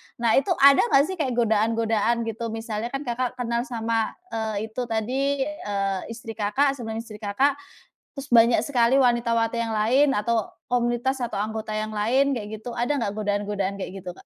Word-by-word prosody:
Nah, 235 -2 +1
itu 360 +5 0
ada 280 0 +8
nggak 275 -9 +5
sih 375 - -3
kayak 260 -5 -1
godaan-godaan 225 0 +1
gitu, 225 +1 -4
misalnya 225 0 -4
kan 275 +3 -5
Kakak 250 0 -2
kenal 240 +1 -2
sama, 225 -2 -1 0.2
eee, 220 -1 -2 0.2
itu 250 - -4
tadi, 265 +5 0
eee, 200 -10 -2
istri 230 0 -7
Kakak 225 +7 +1
sebelum 225 -5 -6
istri 215 -2 -11
Kakak, 270 +8 +1 0.6
terus 275 - -6
banyak 230 -1 +6
sekali 250 -2 +3
wanita 240 -2 +2
wati 230 +1 0
yang 230 -1 -2
lain 250 +7 +3
atau 225 0 0 0.2
komunitas 245 +2 0
atau 225 -4 -3
anggota 220 +1 -3
yang 215 0 -3
lain 260 +6 +2
kayak 215 -1 -6
gitu. 235 +1 -7
Ada 250 +4 0
nggak 205 -3 -2
godaan-godaan 205 -1 -2
kayak 190 0 -6
gitu, 180 - -5
Kak? - - -17
230 Hz, 180 wpm, -24 LUFS, 215-250 Hz, 0.6 s, ada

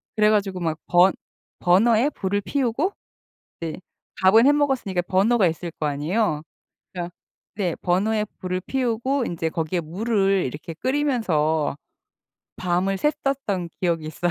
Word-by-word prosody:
그래 210 -1 +4
가지고 200 -3 +1
막 160 -2 -1
번 180 +2 +5 0.5
버너에 225 +8 +4
불을 205 -7 -2
피우고 275 - 0 0.7
네. 165 -2 -4 0.5
밥은 220 +7 +6
해 - - +7
먹었으니까 265 -11 0
버너가 200 +4 +3
있을 165 +1 -3
거 155 - -1
아니에요. 150 +4 0 0.5
그러니까 175 -1 -5 0.4
네, 185 -5 -1
버너에 210 +4 +1
불을 185 0 -2
피우고 255 +4 -1
인제 165 -5 -2
거기에 165 +1 -2
물을 195 +3 +1
이렇게 150 +5 -6
끓이면서 175 - 0 0.8
밤을 185 +2 0
샜었던 275 - -1
기억이 170 -4 0
있어요. 175 +3 -1
190 Hz, 300 characters per minute, -23 LUFS, 170-230 Hz, 0.8 s, 해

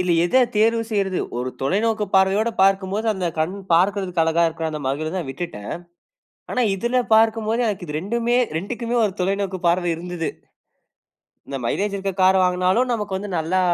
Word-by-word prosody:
இதுல 180 -1 +2
எத 255 +9 +4
தேர்வு 230 +2 +3
செய்றது? 195 -3 0 0.2
ஒரு 125 +1 -2
தொலைநோக்கு 210 +7 +1
பார்வையோடு 195 +4 +3
பார்க்கும்போது, 195 +3 +1
அந்த 190 -3 -3
கண் 160 +5 0 0.2
பார்க்கறதுக்கு 185 -1 +2
அழகா 165 +1 +2
இருக்கற 160 0 -4
அந்த 150 - -4
மகிழுந்ததா 155 +6 -2
விட்டுட்டேன். 135 -8 -6 0.8
ஆனா 250 - +1
இதுல 240 +5 0
பார்க்கும்போது 225 +1 +2
எனக்கு 200 -4 -2
இது 150 - -4
2மே 235 +5 0 0.2
2க்குமே 235 +6 -4
ஒரு 200 - 0
தொலைநோக்கு 195 0 -1
பார்வை 175 0 +2
இருந்தது. 175 -1 -4 1.2
இந்த 140 - -4
மைலேஜ் 200 - -1
இருக்க 195 0 -3
கார 190 +1 +6
வாங்குனாலும் 185 +7 +2
நமக்கு 210 -4 -2
வந்து 200 +1 -5
நல்லா 170 +4 0
190 Hz, 155 wpm, -22 LUFS, 175-215 Hz, 1.2 s, கார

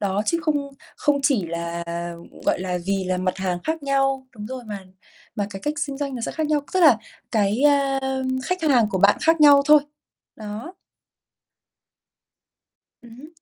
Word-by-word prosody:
Đó, 200 0 0
chứ 335 - +1
không 290 -2 -1 0.3
không 290 -1 +1
chỉ 255 - +2
là 170 +1 -4 0.6
gọi - - +2
là, 180 -1 -2
vì 195 -1 0
là 185 0 -1
mặt 185 0 -1
hàng 185 -2 -1
khác 320 -1 -3
nhau, 270 -1 0
đúng 210 0 -7
rồi, 255 0 -6
mà 210 -2 -6 0.6
mà 205 -1 -2
cái 195 -1 -7
cách 295 - -2
xinh 285 -2 -3
doanh 280 -2 -3
nó 240 - -5
sẽ - - -3
khác 315 -1 -2
nhau. 300 -1 +1
Tức 375 - +2
là 300 -10 +7 0.3
cái, 215 +4 +1
a, 280 -2 +3 0.5
khách 365 0 -2
hàng 245 -8 +3
của 190 - -1
bạn 200 +2 +5
khác 325 0 +3
nhau 285 -1 +8
thôi. 300 0 +7 0.6
Đó. 220 - -7 2.3
Ừm 235 -1 -14
hứm. 295 +4 -11
260 Hz, 180 wpm, -23 LUFS, 200-290 Hz, 2.3 s, nhau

